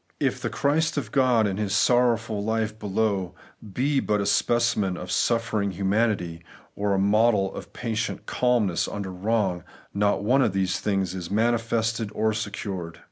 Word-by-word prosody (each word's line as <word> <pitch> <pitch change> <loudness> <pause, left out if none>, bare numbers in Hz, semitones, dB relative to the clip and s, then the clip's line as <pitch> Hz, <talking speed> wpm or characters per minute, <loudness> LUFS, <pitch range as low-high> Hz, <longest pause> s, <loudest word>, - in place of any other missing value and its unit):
If - - 0
the - - -2
Christ 155 +3 0
of 115 -7 -3
God, 125 -4 +3
in 100 -2 -1
His 105 -1 -1
sorrowful 115 -3 +2
life 110 0 -1
below, 100 -2 -1 0.4
be 135 +6 +1
but 105 -4 0
a 100 - -1
specimen 115 -7 +1
of 90 - -6
suffer 115 -2 +1
ing 100 - 0
humanity, 95 -4 0 0.3
or 100 -1 0
a - - 0
model 100 0 +3
of - - -9
patient 115 -1 -3
calmness 120 -8 +1
under 100 -2 -5
wrong, 95 -2 -1 0.3
not 100 0 +1
one 130 +6 +3
of 115 -7 +2
these 95 -1 0
things 95 -3 -1
is 90 -2 -6
manifested 115 0 0
or 110 0 +1
secured. 100 -5 -5
105 Hz, 160 wpm, -25 LUFS, 95-115 Hz, 0.4 s, God